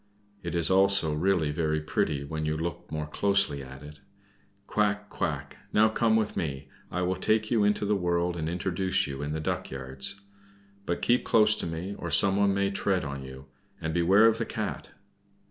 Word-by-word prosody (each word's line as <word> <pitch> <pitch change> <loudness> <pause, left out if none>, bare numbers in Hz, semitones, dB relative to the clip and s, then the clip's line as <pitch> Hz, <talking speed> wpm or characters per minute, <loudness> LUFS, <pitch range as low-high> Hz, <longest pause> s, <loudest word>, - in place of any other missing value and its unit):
It 85 -1 -5
is 85 +1 +2
also 95 -4 +4
really 80 -1 +1
very 75 0 -1
pretty, 75 -2 -1
when 80 +2 -5
you 75 0 -1
look 85 0 -5
more 75 -1 -3
closely 100 -2 +1
at 65 +1 -11
it. 75 0 -12 0.6
Quack! 100 -1 -1
quack! - - -4 0.2
now 110 +1 +5
come 110 0 +2
with 110 -1 0
me, 70 -4 -4 0.2
I 90 +1 -2
will 90 +1 -1
take 110 +3 +1
you 115 -3 +3
into 105 0 +1
the 105 +1 +1
world 85 -1 0
and 80 -1 -3
introduce 95 +2 -1
you 70 -1 -6
in 75 +1 -3
the 80 - -2
duck 75 - -3
yards. 65 +7 0 0.7
But 85 - -2
keep 120 +1 +3
close 110 -1 +4
to - - -3
me, 85 +4 -5
or 85 - -4
someone 100 +5 +4
may 100 0 0
tread 95 -4 0
on 70 -1 -5
you; 65 +1 -10 0.3
and 80 0 -3
beware 95 +6 +4
of 115 0 +3
the 115 - -1
Cat." - - -5
85 Hz, 190 wpm, -27 LUFS, 75-100 Hz, 0.7 s, now